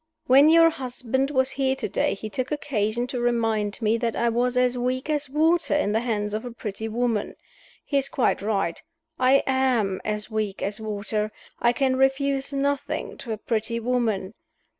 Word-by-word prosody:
When 275 +3 +7
your 330 0 +6
husband 265 -1 -2
was 260 -2 +1
here 265 -1 0
to - - -3
day 290 - 0
he 215 - -6
took 255 +5 -4
occasion 240 -5 -1
to 250 0 -4
remind 225 -3 0
me 220 +2 +3
that 230 -1 -1
I 235 0 +1
was 245 +2 0
as 250 0 +3
weak 255 +4 -1
as 295 -2 -1
water 320 +2 +2
in 295 -8 +1
the 220 - +2
hands 210 -3 -2
of 215 - -2
a 245 - -5
pretty 220 -2 -5
woman. 225 -1 -1 0.5
He 280 - +1
is 275 - -3
quite 255 - +1
right. 195 -5 -1 0.4
I 260 +2 +4
am 250 -8 +1
as 210 +1 -3
weak 215 -2 -2
as 200 +2 -3
water; 215 0 -2 0.3
I 240 - +4
can 260 +1 +1
refuse 270 +1 +1
nothing 280 0 -2
to 235 - -6
a 220 - -2
pretty 225 +2 -2
woman. 225 -5 -1
245 Hz, 180 wpm, -25 LUFS, 215-270 Hz, 0.5 s, When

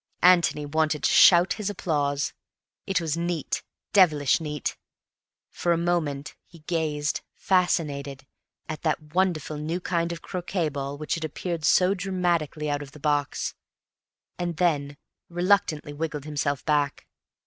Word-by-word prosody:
Antony 175 -4 +5
wanted 155 0 0
to - - +3
shout 175 0 +7
his 210 - -1
applause. 145 -7 -1 0.5
It 195 -1 +2
was 160 -2 -1
neat, 170 -2 -2 0.3
devilish 155 - +4
neat. 150 -3 -3 0.8
For 175 - +1
a - - +1
moment 165 -5 -1
he 165 -3 -17
gazed, 150 -3 -1
fascinated, 145 -7 0 0.4
at 155 - -5
that 155 -1 -2
wonderful 175 -5 0
new 160 +4 -2
kind 170 -2 -1
of 170 - -7
croquet 180 -2 -2
ball 140 0 -4
which 155 +1 -3
had 165 - -3
appeared 165 +1 -4
so 185 +1 +5
dramatically 175 -5 -1
out 145 0 -1
of 145 -1 -10
the 150 - -12
box, 145 -1 0 0.9
and 175 -2 -2
then 145 -5 +1 0.3
reluctantly 175 -4 +1
wriggled 150 -1 -4
himself 145 -2 -2
back. 145 -2 0
155 Hz, 135 wpm, -26 LUFS, 145-175 Hz, 0.9 s, shout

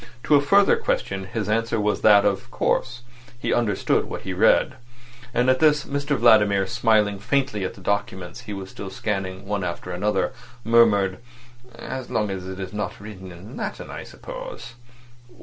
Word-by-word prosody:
To - - +2
a 145 - +7
further 200 +8 +4
question 95 -1 -2
his 105 +1 -4
answer 115 +1 0
was 105 0 0
that, 105 -2 +6
of 100 +4 0
course, 120 0 -1 0.3
he 120 - -1
understood 105 -5 +1
what - - -6
he 95 - -4
read. 110 +6 +3 0.5
At 130 +1 +2
this 150 -2 +4
Mr 145 0 -1
Vladimir, 105 -4 +5
smiling 105 -1 +2
faintly 130 -2 0
at 95 - -4
the 100 - -14
documents 95 +1 -3
he 110 -4 -7
was 95 -1 -7
still 100 - -7
scanning 95 -1 -4
one 100 -1 -2
after 90 +1 -4
another, 95 +2 0 0.3
murmured 105 -5 +4 0.6
"As 130 +1 -6
long 105 -2 0
as 95 -1 -5
it 95 0 -7
is 95 0 -6
not 105 0 -4
written 95 -3 -10
in 95 +8 -11
Latin, - - -5
I - - -6
suppose." - - -9
105 Hz, 165 wpm, -23 LUFS, 95-120 Hz, 0.6 s, a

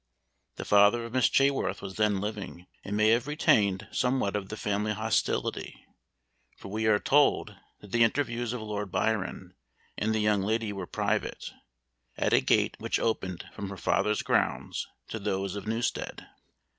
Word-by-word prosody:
The - - -6
father 105 +3 +5
of 115 - -9
Miss 130 -1 +4
Chaworth 135 -8 +2
was 95 -1 -6
then 105 -2 +2
living, 100 -3 -5 0.2
and 105 +1 -3
may 110 0 +4
have 115 +4 +2
retained 100 -10 +2
somewhat 125 -5 0
of 100 -2 -3
the 110 - -5
family 105 +1 -1
hostility, 110 +1 -1 0.7
for - - -10
we 110 +2 -1
are 105 -1 +5
told 145 +6 +2 0.3
that 105 - -13
the 115 +1 +4
interviews 120 -1 0
of 120 -3 -4
Lord 105 -2 -4
Byron 95 -4 -1 0.5
and 110 - 0
the - - +1
young 105 -1 +2
lady 110 +1 -1
were 95 -3 -6
private, - - -2 0.7
at - - +1
a - - +5
gate - - +2
which - - -1
opened 95 -6 -2
from 100 - -6
her 100 - -7
father's 105 +4 +1
grounds - - 0 0.2
to 110 - -4
those 100 -1 -2
of 100 0 -6
Newstead. 115 +2 -2
105 Hz, 165 wpm, -28 LUFS, 100-115 Hz, 0.7 s, father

